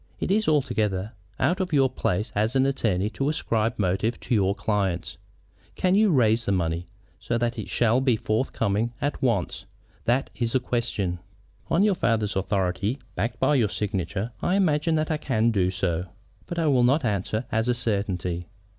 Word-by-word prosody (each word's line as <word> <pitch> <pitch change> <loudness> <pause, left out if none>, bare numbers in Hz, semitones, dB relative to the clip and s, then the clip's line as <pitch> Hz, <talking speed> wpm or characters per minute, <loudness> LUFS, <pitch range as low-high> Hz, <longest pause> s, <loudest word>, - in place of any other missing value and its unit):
It - - -1
is 215 +2 +2
altogether 110 -9 +1 0.3
out 170 +9 +2
of 185 -2 -2
your 135 -2 +5
place 105 -5 -2
as 110 +5 0
an 130 0 +4
attorney 110 -8 +1
to 135 +4 -1
ascribe 115 -6 0
motives 100 +4 0
to - - -2
your 100 -3 +2
clients. 100 -5 -1 0.6
Can 185 0 +2
you 210 +1 +5
raise 115 - +3
the - - 0
money, 85 -2 -1 0.3
so 120 - -1
that 120 0 -1
it - - -6
shall 120 +2 +2
be 130 -3 +3
forthcoming 110 0 -1
at 145 0 -2
once? 115 -9 0 0.4
That 125 +3 +1
is 120 -1 -2
the 130 - +4
question." 115 -8 -2 0.5
"On 170 +4 +3
your 210 -1 +4
father's 110 - 0
authority, 95 +4 0 0.2
backed 115 +5 -2
by 150 - +3
your 120 -7 +3
signature, 100 +2 -2
I 180 - +1
imagine 160 -4 +2
that 155 +1 0
I 155 - +1
can 115 -6 +1
do 95 -4 +2
so. 90 -1 -1 0.4
But 175 - -5
I 165 - +1
will 135 -5 +4
not 135 +4 +3
answer 105 +2 -1
as 110 +2 +1
a 120 - +2
certainty. 95 -6 -2
115 Hz, 180 wpm, -25 LUFS, 100-135 Hz, 0.6 s, your